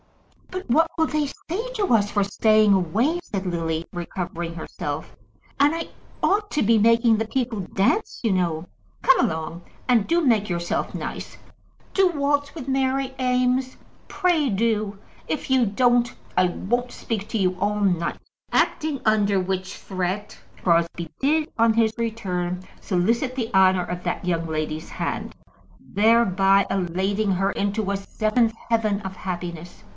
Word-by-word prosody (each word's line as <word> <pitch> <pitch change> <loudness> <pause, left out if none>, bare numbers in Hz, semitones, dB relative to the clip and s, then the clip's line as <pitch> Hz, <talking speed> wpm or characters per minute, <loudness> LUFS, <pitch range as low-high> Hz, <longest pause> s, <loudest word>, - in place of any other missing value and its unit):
"But 370 +1 -6
what 320 +7 +4
will 320 - +3
they 305 -1 0
say 420 - -5
to 405 - +1
us 205 -2 +3
for 205 - +2
staying 215 +1 +4
away?" 215 - +1
said 195 -10 -4
Lily, 165 -2 -2
recovering 175 -1 -4
herself. 150 -2 -5 0.4
"And 290 +2 +5
I 330 - -4 0.3
ought 415 +1 +2
to 300 - +1
be 225 +2 +4
making 230 +1 +4
the 225 0 -2
people 245 -3 -2
dance, 195 - 0
you 225 - +2
know. 170 -3 0 0.4
Come - - +5
along, 160 +2 -1 0.3
and 235 -5 +3
do 340 +1 +3
make 225 -9 +2
yourself 170 -1 -2
nice. - - -6 0.6
Do 385 -2 +4
waltz 285 -2 0
with 285 -5 -7
Mary 265 0 0
Eames; 255 0 +1 0.3
pray, 335 -7 +1
do. 210 -1 0 0.3
If 305 - -3
you 260 -2 +4
don't, 240 +3 +2 0.2
I 185 0 +4
won't 240 +7 -2
speak 215 -3 -4
to 225 - -1
you 185 -2 +1
all 205 +2 0
night!" 175 -4 +1 0.3
Acting 300 -3 +1
under 205 -2 +3
which 185 0 -3
threat, 190 +2 -4 0.3
Crosbie 170 -1 +1
did, 305 +3 +2
on 230 0 +5
his 220 -1 +2
return, 185 -6 -2 0.2
solicit 230 +7 0
the 235 -3 -3
honour 185 -1 +4
of 180 0 -5
that - - -3
young 165 -2 0
lady's 155 0 -3
hand, - - -4 0.4
thereby 200 -3 +3
elating 195 +3 0
her 195 +2 +1
into 200 0 -1
a - - 0
seventh 220 +3 0
heaven 220 -3 +1
of 190 -1 -6
happiness. 175 -2 -6
210 Hz, 150 wpm, -24 LUFS, 185-250 Hz, 0.6 s, And